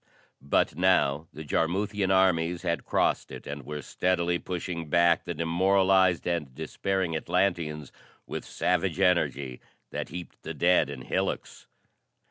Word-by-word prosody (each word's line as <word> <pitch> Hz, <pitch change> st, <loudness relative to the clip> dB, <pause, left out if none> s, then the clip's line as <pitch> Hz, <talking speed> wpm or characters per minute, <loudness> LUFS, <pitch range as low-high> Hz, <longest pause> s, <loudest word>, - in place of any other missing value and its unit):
But 70 Hz, 0 st, +1 dB
now 80 Hz, -4 st, +2 dB
the 75 Hz, -, -8 dB
Jarmuthian 95 Hz, +6 st, 0 dB
armies 90 Hz, -2 st, +2 dB
had 85 Hz, -, -1 dB
crossed -, -, +1 dB
it -, -, -9 dB
and 70 Hz, 0 st, -6 dB
were 75 Hz, +1 st, -6 dB
steadily 85 Hz, +1 st, 0 dB
pushing 85 Hz, -3 st, -5 dB
back 85 Hz, +1 st, +3 dB
the 85 Hz, -, -4 dB
demoralized 95 Hz, +2 st, +3 dB
and 80 Hz, -7 st, -2 dB
despairing 95 Hz, -4 st, -2 dB
Atlanteans 80 Hz, -4 st, -1 dB, 0.3 s
with -, -, -5 dB
savage 90 Hz, 0 st, -1 dB
energy 70 Hz, -9 st, +1 dB, 0.3 s
that -, -, -4 dB
heaped 90 Hz, -1 st, -8 dB
the -, -, -6 dB
dead 90 Hz, -5 st, +3 dB
in 65 Hz, -3 st, -7 dB
hillocks. -, -, -3 dB
85 Hz, 130 wpm, -28 LUFS, 75-95 Hz, 0.3 s, back